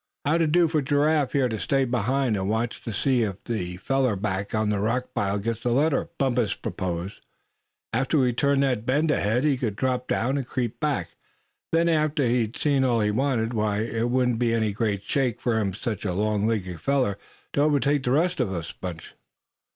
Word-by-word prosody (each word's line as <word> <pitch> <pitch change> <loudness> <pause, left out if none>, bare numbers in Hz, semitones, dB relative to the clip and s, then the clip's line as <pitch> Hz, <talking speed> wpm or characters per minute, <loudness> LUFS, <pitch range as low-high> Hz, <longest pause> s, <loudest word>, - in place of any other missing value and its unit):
"How'd 160 +4 +2
it 155 -2 +2
do 175 +1 +5
for 155 -1 +1
Giraffe 145 +1 +2
here 135 -3 +3
to 110 -3 -3
stay 135 +4 +1
behind, 125 0 0
and 95 0 -2
watch 115 +2 -1
to 115 - -3
see 125 +4 +1
if 100 -3 -3
that 90 -6 -4
feller 135 -3 +1
back 95 0 -3
of 110 0 +1
the 105 -1 0
rock 125 +5 -1
pile 100 -4 0
gets 115 +3 -2
the 120 - 0
letter?" 145 +2 +1
Bumpus 120 -6 +1
proposed. 90 0 -4 0.7
"After 135 +6 +1
we 125 -3 +3
turned 140 +2 +2
that 125 -5 0
bend 145 +6 +2
ahead 110 +1 +1
he 145 -3 +2
could 115 -5 -2
drop 125 +1 -1
down, 130 +5 0
and 130 - -5
creep 125 -3 -3
back. 140 - -1 0.6
Then, 165 +1 +3
after 155 -4 +2
he'd 120 -2 0
seen 140 -3 +2
all 120 -3 +2
he 105 0 +2
wanted, 120 -1 0
why 105 -2 0
it 115 +1 -1
wouldn't 125 -2 +1
be 115 -1 +2
any 110 -2 0
great 100 -2 -1
shake 125 +1 0
for 110 -5 0
such 105 +1 -4
a 95 -4 -2
long 105 +1 +1
legged 95 -7 -2
feller 130 -5 +1 0.3
to 140 - +2
overtake 145 -1 +2
the 125 - -2
rest 170 +6 +2
of 125 -6 +1
the 85 -4 -4
bunch." 85 -3 -7
120 Hz, 200 wpm, -25 LUFS, 105-135 Hz, 0.7 s, do